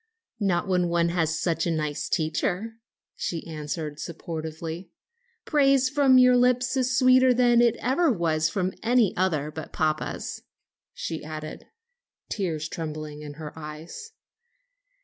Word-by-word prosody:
"Not 195 -3 +1
when 180 -2 +2
one 170 0 +2
has 165 -2 0
such 165 -1 0
a - - +1
nice 150 -2 -2
teacher," 180 +8 -1 0.4
she 165 -2 -4
answered 150 -1 -5
sportively. 160 +1 -6 0.6
"Praise 275 -3 +3
from 275 -2 +5
your 250 0 +6
lips 250 +1 +2
is 255 -1 +1
sweeter 255 -1 +5
than 240 -1 +4
it 235 -1 +4
ever 275 +6 +2
was 165 -6 +1
from 185 0 -1
any 235 -3 +3
other 155 -5 0
but 160 +1 -8
papa's," 155 -1 -2 0.5
she 160 - -4
added, 155 0 -7 0.6
tears 165 -6 -2
trembling 155 -3 -6
in 150 -1 -8
her 150 -1 -8
eyes. 160 - -9
170 Hz, 130 wpm, -26 LUFS, 155-245 Hz, 0.6 s, your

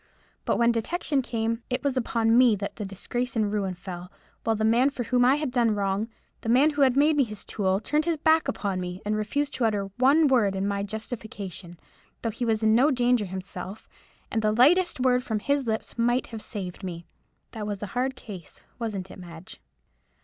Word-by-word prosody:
But - - +1
when 235 0 +4
detection 275 +4 -1
came, 230 -1 -2
it 250 +2 -2
was 280 -2 0
upon 230 -2 +2
me 245 -3 +6
that 200 0 -5
the 210 - -4
disgrace 240 +6 -3
and 215 -2 +1
ruin 195 -3 -1
fell; 180 0 -8 0.3
while 225 - +1
the 220 0 0
man 235 +5 +4
for 260 -3 -4
whom 245 +1 +2
I 255 +3 +5
had 295 -3 -2
done 235 -4 +2
wrong—the 205 +3 -4
man 270 +6 +5
who 290 -1 -2
had 265 -1 +4
made 300 +2 +4
me 285 - +4
his 215 -4 -6
tool—turned 205 +10 0
his 335 -2 0
back 315 +1 +3
upon 195 -3 -2
me, 180 +1 -6
and 210 +1 0
refused 280 +8 -1
to 245 - 0
utter 200 -3 -1
one 290 +5 +5
word 225 -8 +3
in 195 +1 -1
my 200 0 -1
justification, 200 -5 -6 0.4
though 230 - 0
he 235 +3 -3
was 220 -1 0
in 220 0 +4
no 255 +6 +5
danger 245 -4 +2
himself, 190 +2 -6 0.4
and 225 - 0
the 215 0 +2
lightest 300 +10 +4
word 250 -1 +3
from 220 -3 -1
his 280 +4 0
lips 220 -1 -3
might 240 +2 +2
have 220 - -5
saved 195 -4 -6
me. 170 -2 -6 0.5
That 215 -3 -5
was 205 -1 -4
a 205 - -6
hard 255 +2 0
case, 190 -9 -10 0.2
wasn't 200 -5 -4
it, - - -11
Madge?" 170 -1 -11
225 Hz, 205 wpm, -26 LUFS, 200-255 Hz, 0.5 s, me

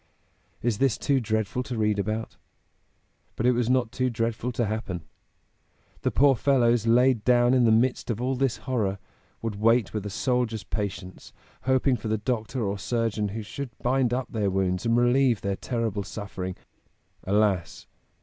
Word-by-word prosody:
Is 115 -3 0
this 135 -7 +2
too 140 -2 +1
dreadful 110 0 -1
to 125 -2 -5
read 105 -1 +1
about? 110 +3 -3 1.0
But 115 - -2
it 125 - +6
was 120 -1 0
not 125 -3 +2
too 130 0 0
dreadful 115 +1 -2
to 120 +1 0
happen. 100 -5 -4 1.0
The - - +1
poor 140 -1 +4
fellows, 120 -3 +2
laid 125 -1 +4
down 120 +1 +4
in 125 -2 +4
the 115 - +5
midst 125 +4 +2
of 115 -2 -1
all 130 +2 0
this 130 -1 0
horror, 110 -7 0 0.5
would 110 -3 -3
wait 115 -1 +3
with 105 -2 -2
a 105 - -4
soldier's 115 -1 -1
patience, 100 -2 -5 0.3
hoping 130 0 +2
for 110 - -6
the 110 0 +1
doctor 115 +1 -2
or 100 0 -2
surgeon 115 -1 -1
who 105 +2 -5
should 120 +4 -7
bind 125 0 +2
up 125 +1 -2
their 105 -3 0
wounds 95 +1 0
and 115 +1 +3
relieve 120 -1 +3
their 100 0 -1
terrible 115 -3 -2
suffering. 95 -2 -6 0.7
Alas! 100 -3 0
115 Hz, 170 wpm, -26 LUFS, 105-125 Hz, 1.0 s, it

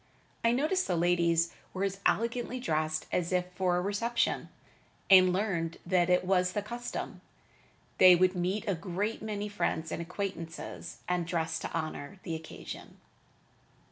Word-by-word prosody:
I 230 - +4
noticed 310 +9 +1
the - - +1
ladies 170 -1 +2 0.2
were 190 - -1
as 195 0 -1
elegantly 235 +3 0
dressed 155 -7 -1
as 175 0 0
if 180 0 0
for 180 -1 +1
a - - +1
reception, 230 +5 0 0.6
and 185 -1 +8
learned 180 -4 -1
that 175 -1 +2
it 180 0 +3
was 180 -1 +2
the 205 - -1
custom. 240 +3 -5 0.8
They 185 -1 +9
would 185 +1 +3
meet 185 +5 -1
a 200 - +2
great 190 +5 -3
many 210 -1 -3
friends 165 -5 -2
and - - -3
acquaintances, 170 -2 -6
and 180 -2 0
dressed 160 -2 -1
to - - -4
honor 160 +2 -4
the 165 - -4
occasion. 160 0 -8
180 Hz, 150 wpm, -30 LUFS, 170-205 Hz, 0.8 s, They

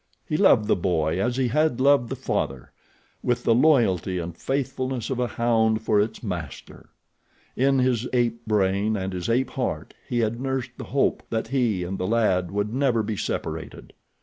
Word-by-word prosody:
He 155 - -1
loved 130 - +4
the - - +3
boy 85 -1 0
as 125 +2 0
he 130 -2 +1
had 150 -1 +1
loved 135 -3 +4
the - - -3
father, 65 -2 -3 0.5
with 120 -1 0
the 115 - +4
loyalty 115 - +3
and 85 -1 -5
faithfulness 130 +1 -2
of 130 - -2
a 125 - +1
hound 110 -2 +1
for 105 -2 +3
its 110 +3 -3
master. 90 - -7 0.7
In 135 +1 +2
his 125 -2 +1
ape 120 -2 0
brain 105 +1 +1
and 95 -1 -3
his 90 +1 -4
ape 125 +3 +1
heart 85 - -3 0.2
he 120 - -1
had 115 +2 -1
nursed 130 -2 -2
the - - -7
hope 140 +1 +1
that 110 0 -2
he 120 -9 +1
and 95 +2 -4
the 90 - -1
lad 95 -5 +1
would 105 +3 -2
never 125 -4 +1
be 105 0 -3
separated. - - -5
115 Hz, 180 wpm, -24 LUFS, 95-130 Hz, 0.7 s, loved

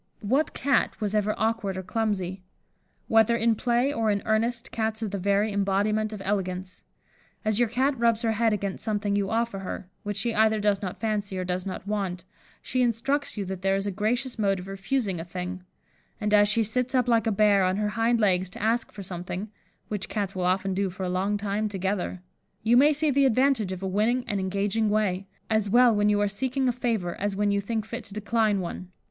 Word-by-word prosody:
What 265 +9 +1
Cat 275 -3 +1
was 210 -2 -2
ever 210 0 +1
awkward 220 -4 -1
or 190 - -4
clumsy? 195 -3 -2 0.7
Whether 225 +1 +4
in 230 0 +3
play 240 +5 +1
or 225 -3 0
in 205 -1 0
earnest, 230 +2 0
Cats 220 0 -2
are - - -1
the 200 0 -4
very 200 +2 +1
embodiment 205 +2 +1
of 210 -2 -7
elegance. 185 -2 -3 0.6
As 215 0 +2
your 240 -2 +3
Cat 260 +3 +1
rubs 230 0 +2
her 225 - +2
head 225 +1 +2
against 200 -2 -3
something 205 -2 0
you 200 -1 0
offer 230 -3 -1
her, 185 -1 -6
which 205 -2 -4
she 230 +3 -1
either 220 0 +3
does 205 -1 +1
not 185 -3 -5
fancy 210 -3 -2
or 185 - -1
does 180 +1 -3
not 190 - -5
want, 195 -4 -2 0.4
she 255 - 0
instructs 250 +4 0
you 200 - -2
that 190 -1 -5
there 195 0 +2
is 195 0 -1
a 205 - -1
gracious 235 +5 -1
mode 195 -2 +2
of 185 +1 -8
refusing 195 0 -2
a - - -4
thing; 180 +1 -6 0.6
and 210 0 -1
as 205 0 +6
she 225 +1 +3
sits 250 +4 -1
up 250 -2 +3
like 230 -1 +3
a - - +3
bear, 205 -1 +4
on 185 0 +2
her 210 0 0
hind 230 +2 +1
legs, 190 -3 +2
to - - -11
ask 230 +2 +1
for 200 - -8
something 180 +3 -5 0.4
(which 210 -2 -4
Cats 200 -3 -2
will 185 -1 -1
often 190 +1 +1
do 195 +1 0
for 185 +1 -6
a 180 - -1
long 190 +3 0
time 205 +1 -1
together), 190 -2 -2 0.4
you 225 +2 +4
may 285 +5 +6
see 305 0 +1
the 275 0 +4
advantage 255 -5 +2
of 185 0 -5
a - - -1
winning 225 +6 +1
and 205 - -1
engaging 200 +3 0
way, 200 -3 0 0.2
as 220 -2 +1
well 240 +1 +5
when 205 0 +3
you 205 0 +3
are 205 - +2
seeking 260 +6 -1
a - - +4
favour 225 -8 -1
as 205 -1 -1
when 205 +1 +1
you 200 0 +1
think 220 +1 -2
fit 235 +2 -6
to 200 -2 -10
decline 215 -1 +1
one. 180 +1 -6
210 Hz, 220 wpm, -26 LUFS, 195-230 Hz, 0.7 s, as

